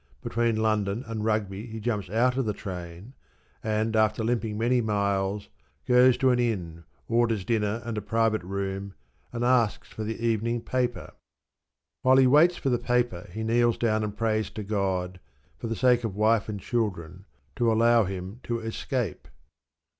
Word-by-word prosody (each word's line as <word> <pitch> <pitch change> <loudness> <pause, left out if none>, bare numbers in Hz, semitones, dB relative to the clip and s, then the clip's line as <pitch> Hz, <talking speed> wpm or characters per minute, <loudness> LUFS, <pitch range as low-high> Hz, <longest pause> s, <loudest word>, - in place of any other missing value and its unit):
Between 115 -1 0
London 110 0 0
and 110 -1 -4
Rugby 105 -1 -1
he 110 -1 -7
jumps 105 -5 -2
out 120 +5 +2
of 135 -1 0
the 105 - -1
train, 90 +4 -8 0.5
and, 110 +1 0
after 110 0 +2
limping 110 -2 -1
many 120 +2 +2
miles, 100 -2 -1 0.4
goes 125 0 +5
to 130 -1 +3
an 125 - +2
inn, 85 -9 -2 0.2
orders 115 -4 +1
dinner 110 0 0
and 115 -1 -3
a - - -8
private 110 +1 +1
room, 95 +1 -4 0.4
and 120 0 -3
asks 120 -3 +2
for 110 - -6
the 110 +1 -3
evening 115 +1 0
paper. 125 -1 -2 0.9
While 130 +1 +5
he 135 - +6
waits 155 +7 +5
for 135 - -1
the 120 -2 +1
paper 120 -8 -1
he 110 +4 -5
kneels 120 +1 +2
down 110 -2 +1
and 105 -1 -4
prays 110 -1 0
to 105 - -6
God, 95 -3 -2 0.4
for - - -4
the 115 - -2
sake 125 -1 +3
of 110 -4 -3
wife 110 0 +2
and 105 -1 -4
children, 95 -5 -3 0.3
to 120 -3 +3
allow 115 0 +4
him 95 +4 -6
to 120 -1 -3
escape. 115 0 -3
110 Hz, 170 wpm, -27 LUFS, 100-120 Hz, 0.9 s, he